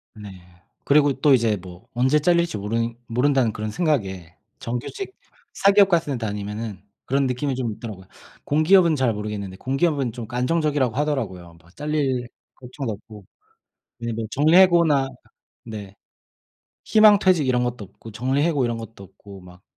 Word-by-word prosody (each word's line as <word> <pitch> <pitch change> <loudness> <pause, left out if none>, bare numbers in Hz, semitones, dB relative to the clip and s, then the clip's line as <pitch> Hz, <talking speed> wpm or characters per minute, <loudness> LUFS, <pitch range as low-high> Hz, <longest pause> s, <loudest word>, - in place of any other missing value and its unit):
네. 105 -1 -10 0.5
그리고 145 -1 +4
또 145 -3 +5
이제 115 -4 +3
뭐 90 0 -13
언제 130 +5 +2
잘릴지 170 -5 +1
모른 115 +3 -2
모른다는 125 -1 +2
그런 105 0 -4
생각에 95 - -2 0.2
정규직 370 - -5 0.4
사기업 200 0 +4
같은 160 -7 +1
데 115 - -4
다니면은 105 0 -5 0.2
그런 135 +1 +1
느낌이 130 +1 -2
좀 120 -4 -2
있더라고요. 105 -4 -9 0.4
공기업은 165 +3 +4
잘 130 -5 +1
모르겠는데 105 -2 -5
공기업은 135 - 0
좀 115 -1 -8
그 125 - -8
안정적이라고 140 -2 0
하더라고요, 105 - -3
막 85 +3 -23
잘릴 140 -5 -1 0.3
걱정도 125 -2 -6
없고. 105 -1 -13 0.8
예 115 0 -2
뭐 110 0 -4
정리 150 +6 +2
해고나 170 -7 +5 0.6
네 105 -3 -9 0.9
희망 215 -1 +6
퇴직 185 -7 +2
이런 125 -1 +2
것도 120 -3 -4
없고 110 +3 -14
정리 130 +6 0
해고 155 -4 +1
이런 120 -1 -1
것도 115 -3 -10
없고 100 +1 -14
막 90 0 -16
125 Hz, 340 characters per minute, -23 LUFS, 105-150 Hz, 0.9 s, 희망